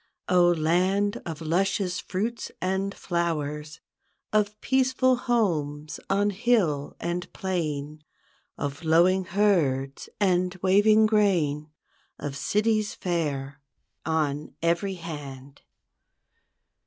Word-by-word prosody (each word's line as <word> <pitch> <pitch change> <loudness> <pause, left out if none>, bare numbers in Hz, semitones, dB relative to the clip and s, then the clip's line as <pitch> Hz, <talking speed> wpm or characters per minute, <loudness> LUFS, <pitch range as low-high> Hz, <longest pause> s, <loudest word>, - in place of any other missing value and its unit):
0, 175 -1 +5
land 185 +6 +1
of 165 -1 -6
luscious 180 +2 0
fruits 220 +5 -3
and 190 +2 -1
flowers. 150 -3 -3 0.5
Of 210 0 +1
peaceful 260 -1 +2
homes 155 - -1
on 205 +1 +2
hill 190 -10 +1
and 175 +1 -3
plain. 155 -5 -3 0.5
Of 145 +2 -4
lowing 175 +4 +4
herds 155 -10 +1
and 180 -2 +2
waving 210 +3 +5
grain. 175 -9 +1 0.5
Of 145 -1 -5
cities 215 +5 0
fair, 145 -6 -3 0.4
on 150 -2 -1
every 175 +4 +1
hand. 140 -5 -9
175 Hz, 95 wpm, -26 LUFS, 150-200 Hz, 0.5 s, 0